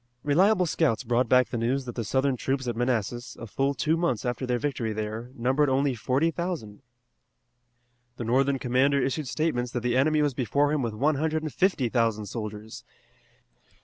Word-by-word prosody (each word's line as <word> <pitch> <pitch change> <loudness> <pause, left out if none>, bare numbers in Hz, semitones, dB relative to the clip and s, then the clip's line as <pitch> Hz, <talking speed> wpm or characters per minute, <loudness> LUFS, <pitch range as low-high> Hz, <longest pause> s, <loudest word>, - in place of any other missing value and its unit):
Reliable 180 +6 +3
scouts 150 -8 +1
brought 120 0 +1
back 125 0 +4
the 120 - -3
news 130 +4 0
that 120 - -6
the 115 - -3
Southern 130 +4 +1
troops 130 +1 -2
at 120 - -1
Manassas, 120 -1 -2
a 115 - -6
full 135 +5 -1
two 155 +5 +1
months 165 -10 -1
after 125 +1 -2
their 125 -1 +1
victory 120 -5 -2
there, 110 +3 -4
numbered 130 +5 +1
only 135 +1 +2
forty 130 +7 0
thousand. 160 - -5 1.4
The - - -4
Northern 135 +4 +2
commander 130 +3 +2
issued 135 +2 -1
statements 125 -3 -1
that 125 - -2
the 120 0 0
enemy 150 +3 +3
was 145 -2 +1
before 140 +4 +1
him 150 - 0
with 115 -3 -3
one 145 +6 +1
hundred 155 +1 -1
and 155 - -4
fifty 180 -9 +1
thousand 115 -3 0
soldiers. 105 0 -7
130 Hz, 180 wpm, -26 LUFS, 120-145 Hz, 1.4 s, back